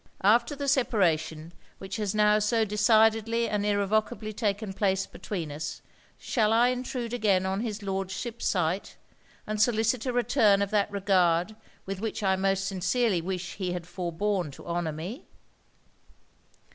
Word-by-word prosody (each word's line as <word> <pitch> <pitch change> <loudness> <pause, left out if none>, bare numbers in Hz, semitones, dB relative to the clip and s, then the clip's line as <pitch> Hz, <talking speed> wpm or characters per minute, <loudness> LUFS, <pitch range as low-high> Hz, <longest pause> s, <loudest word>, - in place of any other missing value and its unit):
After 235 +7 +4
the 280 0 -4
separation 170 - +1 0.2
which 195 +2 -6
has 210 -1 -2
now 210 0 +4
so 220 +1 +2
decidedly 225 +2 +3
and 205 -1 -1
irrevocably 215 +2 0
taken 205 -2 -2
place 190 -1 +1
between 170 -7 -6
us, 150 +1 -6 0.3
shall 220 -3 0
I 235 +2 +4
intrude 250 -1 -3
again 200 -6 +2
on 190 +1 -1
his 215 -3 -4
Lordship's 195 +4 -3
sight? 180 +1 -1 0.5
and 215 0 -2
solicit 225 +2 +2
a - - +1
return 235 -5 +3
of 200 - -4
that 210 -1 +2
regard 190 -1 +2 0.3
with 195 0 -5
which 220 -1 -3
I 190 -1 +3
most 195 0 0
sincerely 195 +1 0
wish 180 0 -5
he 185 -3 -2
had 175 -2 -5
forborne 180 +1 -2
to - - -13
honour 170 -1 -2
me?' 175 - -7
205 Hz, 145 wpm, -27 LUFS, 185-225 Hz, 0.5 s, After